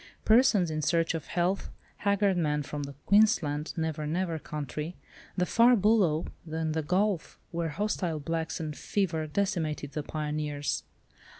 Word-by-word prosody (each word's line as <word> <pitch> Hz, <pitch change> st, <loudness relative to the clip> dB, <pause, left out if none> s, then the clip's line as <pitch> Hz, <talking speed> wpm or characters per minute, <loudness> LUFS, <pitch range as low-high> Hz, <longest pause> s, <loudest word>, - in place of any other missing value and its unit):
Persons 220 Hz, -7 st, +5 dB
in 155 Hz, 0 st, -2 dB
search 165 Hz, +2 st, +2 dB
of 165 Hz, -, -4 dB
health, 180 Hz, +3 st, 0 dB, 0.3 s
haggard 200 Hz, -1 st, +2 dB
men 150 Hz, -4 st, +1 dB
from 145 Hz, +1 st, -5 dB
the 140 Hz, -1 st, -6 dB
Queensland 170 Hz, -8 st, +3 dB
"Never 160 Hz, -2 st, -2 dB
Never" 165 Hz, 0 st, -1 dB
country, 150 Hz, +3 st, -5 dB, 0.4 s
the 180 Hz, -, +2 dB
far 235 Hz, +5 st, +5 dB
"Bulloo," 200 Hz, -7 st, +3 dB, 0.3 s
and 160 Hz, -1 st, -1 dB
"The 160 Hz, -, 0 dB
Gulf," 185 Hz, +3 st, 0 dB
where 170 Hz, -1 st, -1 dB
hostile 175 Hz, -2 st, -1 dB
blacks 160 Hz, +2 st, -2 dB
and 155 Hz, -2 st, -4 dB
fever 165 Hz, -5 st, -1 dB
decimated 155 Hz, -5 st, -1 dB
the 150 Hz, -, -3 dB
pioneers! 150 Hz, -1 st, -2 dB
160 Hz, 140 wpm, -29 LUFS, 150-190 Hz, 0.4 s, Persons